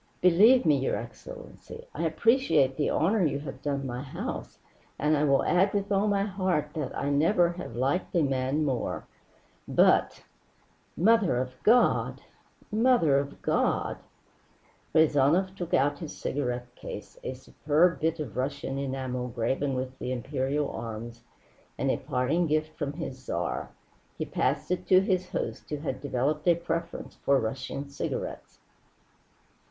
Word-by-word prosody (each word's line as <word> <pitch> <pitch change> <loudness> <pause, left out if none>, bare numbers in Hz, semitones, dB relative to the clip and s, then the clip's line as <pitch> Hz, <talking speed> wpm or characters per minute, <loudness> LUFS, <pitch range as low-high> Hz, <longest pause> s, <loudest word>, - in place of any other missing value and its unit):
"Believe 205 +8 +6
me, 150 -3 +5
your 130 - 0
excellency, 485 -1 -9
I - - -2
appreciate 160 - +3
the 145 - 0
honor 190 +5 +2
you 150 -3 +1
have 135 -2 -8
done 140 -2 -2
my 125 -1 -4
house, 135 - -6 0.4
and 150 +2 +2
I 145 - +1
will 140 -1 +3
add 190 +3 +2
with 200 0 -1
all 200 +1 +2
my 200 -1 +2
heart 185 -6 -1
that 140 -2 -3
never 170 +5 +3
have 175 -9 -7
I - - -4
liked 140 +9 0
a 170 - +4
man 135 +2 0
more. 130 -4 -2 0.6
But - - +3 0.7
Mother 205 - +4
of 130 0 -2
God! 240 +3 +3 0.5
Mother 215 - +4
of 140 0 -6
God!" - - +1 1.0
Rezanov 160 +4 +4
took 175 -3 -5
out 145 +1 +2
his 160 - -7
cigarette 125 -3 -3
case, - - -9
a 130 - -4
superb 150 +6 +1
bit 165 +1 0
of 130 -10 -5
Russian 135 +1 -2
enamel, 130 -2 -3
graven 130 +3 -1
with 130 0 -4
the 125 - -3
Imperial 135 +3 -1
arms, 115 +1 -6 0.6
and - - +1
a - - 0
parting 145 +8 0
gift 155 +1 0
from 145 -3 -3
his 145 -5 -6
Tsar. 85 -9 -3 0.5
He - - -2
passed - - -1
it 180 0 -1
to 185 0 +6
his 185 -2 0
host, - - -4
who 150 - -2
had 140 -3 -4
developed 145 +3 -1
a 170 - +6
preference 170 0 -4
for 140 -1 +2
Russian 130 +5 -4
cigarettes. 140 - -5
145 Hz, 150 wpm, -28 LUFS, 130-175 Hz, 1.0 s, Believe